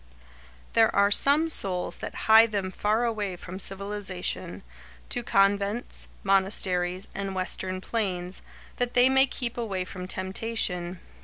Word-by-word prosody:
There 225 -1 +5
are 200 0 +4
some 300 +8 +4
souls 185 - +2
that - - -7
hie 220 +1 +8
them 200 -4 -3
faraway 215 -2 -1
from 185 +1 -9
civilisation, 195 -1 -3 0.5
to - - -2
convents, 200 +3 0 0.2
monasteries, 190 -1 0
and 195 -1 -4
western 185 0 -3
plains, 185 -5 -3 0.4
that 245 0 -2
they 250 +1 +6
may 265 +1 +5
keep 240 -2 -4
away 195 -6 -2
from 185 -1 -8
temptation. 185 -2 -2
195 Hz, 125 wpm, -27 LUFS, 185-225 Hz, 0.5 s, hie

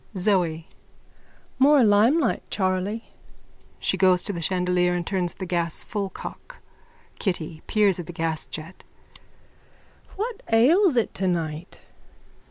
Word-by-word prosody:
ZOE: 180 -5 +1 0.9
More 280 0 +6
limelight, 230 +7 +3
Charley. 190 +3 -2 0.6
(She - - -1
goes 185 -2 +4
to 205 - -3
the 170 - -5
chandelier 180 0 +1
and 175 -1 -3
turns 180 -2 -2
the 190 - -6
gas 170 -2 0
full 200 -2 -3
cock.) - - -10 0.6
KITTY: 165 -5 -3
(Peers 205 -4 +3
at 170 - -6
the - - -6
gasjet.) 160 +1 -4 1.3
What 450 +3 -4
ails 300 - +4
it 235 - +1
tonight? 170 -3 -3
185 Hz, 115 wpm, -24 LUFS, 175-225 Hz, 1.3 s, More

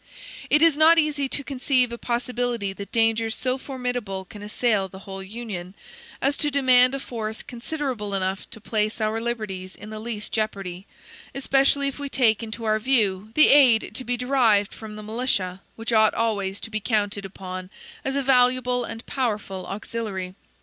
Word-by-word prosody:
It 300 +2 +5
is 320 -3 +5
not 325 +2 +7
easy 295 -3 +1
to 285 - 0
conceive 255 -2 +1
a 235 - -5
possibility 240 -4 -2
that 200 +1 -9
dangers 225 0 +2
so 255 0 -1
formidable 245 -8 -4
can 205 +2 -11
assail 210 -1 0
the 190 - -12
whole 195 -1 -7
Union, 190 -3 -7 0.5
as 280 +1 +2
to 295 - 0
demand 260 -2 +5
a - - -3
force 220 -4 -5
considerable 240 -5 -4
enough 190 0 -2
to - - -10
place 215 +1 -1
our 220 +1 0
liberties 210 -6 -4
in 210 +2 -10
the 215 - -6
least 215 -1 -5
jeopardy, 195 -4 -3 0.5
especially 275 +1 +2
if 275 - -5
we 285 -1 -4
take 235 -5 +3
into 225 0 -6
our 215 -1 +2
view 215 -5 +2
the 305 - +7
aid 255 -6 +6
to 255 - -4
be 245 0 -1
derived 240 -6 +3
from 220 -1 -9
the 215 - -8
militia, 210 -5 -1
which 230 +1 -4
ought 220 -1 +5
always 205 -4 -1
to 225 - -6
be 215 - -1
counted 205 -2 0
upon 185 -1 -7 0.3
as 270 +1 -2
a 280 - +1
valuable 250 -1 +3
and 225 0 -7
powerful 210 -7 -2
auxiliary. 195 -3 -4
225 Hz, 175 wpm, -24 LUFS, 205-255 Hz, 0.5 s, not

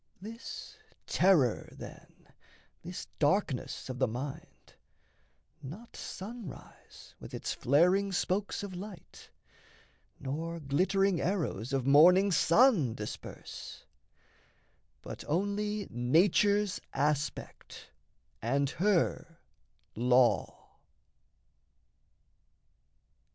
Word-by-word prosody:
This 225 +5 -9 0.3
terror, 165 - +3
then, - - -13 0.5
this 175 +2 -7
darkness 145 -3 0
of 130 -1 -6
the - - +3
mind, 130 +5 -7 0.9
Not 190 - -10
sunrise 210 - -9
with - - -9
its - - -3
flaring 180 +9 +3
spokes 195 +3 -1
of 200 -2 -6
light, 185 -1 -10 0.9
Nor 160 +5 -4
glittering 185 +6 +1
arrows 155 - -2
of 135 -2 0
morning 180 +8 +6
sun 170 - +4
disperse, 105 - -8 1.2
But - - -8
only 205 +5 -1
nature's 180 - +3 0.2
aspect 145 +1 -3 0.5
and 140 +5 0
her 175 -3 0 0.6
law. 125 +1 +2
170 Hz, 75 wpm, -31 LUFS, 140-200 Hz, 1.2 s, morning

